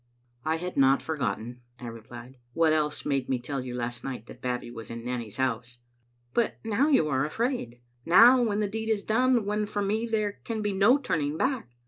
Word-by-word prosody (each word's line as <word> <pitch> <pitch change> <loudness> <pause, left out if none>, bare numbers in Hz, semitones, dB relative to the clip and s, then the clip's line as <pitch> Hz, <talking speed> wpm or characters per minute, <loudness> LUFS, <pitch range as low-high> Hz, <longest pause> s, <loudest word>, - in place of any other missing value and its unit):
"I 155 +1 +1
had 180 +2 -5
not 135 0 +5
forgotten," 125 -5 -3 0.2
I - - -8
replied. 120 +2 -10 0.2
"What 165 -1 +3
else 150 -1 0
made 135 -3 -1
me 130 - +1
tell 135 +3 -4
you 125 -1 -6
last 120 0 -4
night 125 -5 -5
that 125 - -13
Babbie 125 -1 -3
was 115 -3 -8
in 115 0 -7
Nanny's 120 -4 -4
house?" 125 -2 -2 0.3
" 120 0 -42
But 235 - +1
now 225 +6 +2
you 265 - +4
are 135 -1 +1
afraid 155 - -2
— - - -41
now 235 +9 +8
when 215 -3 +1
the 210 - +1
deed 220 +2 -4
is 215 -2 +1
done, 245 0 +2
when 210 +1 -1
for 205 -1 -2
me 215 +4 0
there 215 -2 -1
can 220 -2 -3
be 205 -1 0
no 205 +8 +5
turning 155 - -1
back. 260 - -1
155 Hz, 210 wpm, -27 LUFS, -, 0.3 s, now